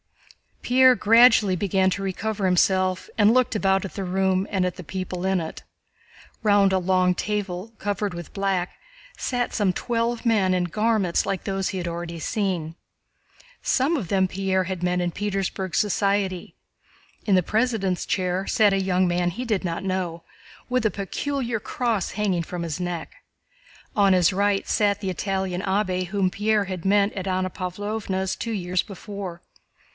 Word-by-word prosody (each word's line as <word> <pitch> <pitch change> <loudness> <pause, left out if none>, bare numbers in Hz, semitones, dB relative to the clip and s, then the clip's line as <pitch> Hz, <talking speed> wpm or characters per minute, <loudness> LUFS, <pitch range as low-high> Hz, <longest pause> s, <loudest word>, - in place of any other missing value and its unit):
Pierre 255 +1 +6
gradually 225 -3 +5
began 190 0 +2
to 195 - -2
recover 195 +1 -2
himself 185 0 +2
and 210 0 +5
looked 255 -2 +2
about 195 -1 +2
at 195 - -7
the 195 - -4
room 190 +1 +1
and 190 -2 0
at 180 - -2
the 180 - -7
people 185 +1 -4
in 190 -1 +2
it. 160 -1 -6 0.8
Round 205 -2 +4
a 190 - +3
long 185 0 +2
table 205 +1 -3
covered 205 -1 -2
with 175 -1 -8
black 195 -3 -1 0.4
sat 245 -1 -2
some 200 -4 +1
twelve 235 +3 -1
men 205 -5 +3
in 180 -1 +1
garments 210 -1 +1
like 190 - -2
those 195 -1 -1
he 190 - -4
had 175 -1 -3
already 170 0 -5
seen. 180 -5 -2 0.9
Some 280 +6 +1
of 210 -10 -4
them 190 +1 +2
Pierre 190 0 0
had 185 -1 -4
met 180 0 +1
in 175 0 -1
Petersburg 195 -1 -3
society. 200 -2 0 0.7
In 200 - +3
the 185 - +3
President's 215 -4 0
chair 185 0 -1
sat 210 -3 +4
a 195 - +1
young 185 -1 +2
man 175 0 +1
he 240 +9 -5
did 215 -5 0
not 170 +1 -3
know, 185 -3 -2 0.5
with 250 -2 +1
a 215 - +3
peculiar 240 +3 -3
cross 225 -2 -1
hanging 195 -5 0
from 175 +1 -5
his 165 0 -4
neck. 175 -2 -4 0.8
On 200 -2 +4
his 180 0 +4
right 200 +1 +1
sat 205 -1 +2
the 195 -2 -2
Italian 190 -1 -2
abbé 190 -2 0
whom 190 -1 0
Pierre 210 0 +1
had 185 -2 -6
met 200 +1 +3
at 195 -1 -5
Anna 185 0 0
Pávlovna's 190 0 -3
two 230 - -4
years 180 -2 0
before. 200 -3 -8
190 Hz, 165 wpm, -24 LUFS, 180-210 Hz, 0.9 s, Pierre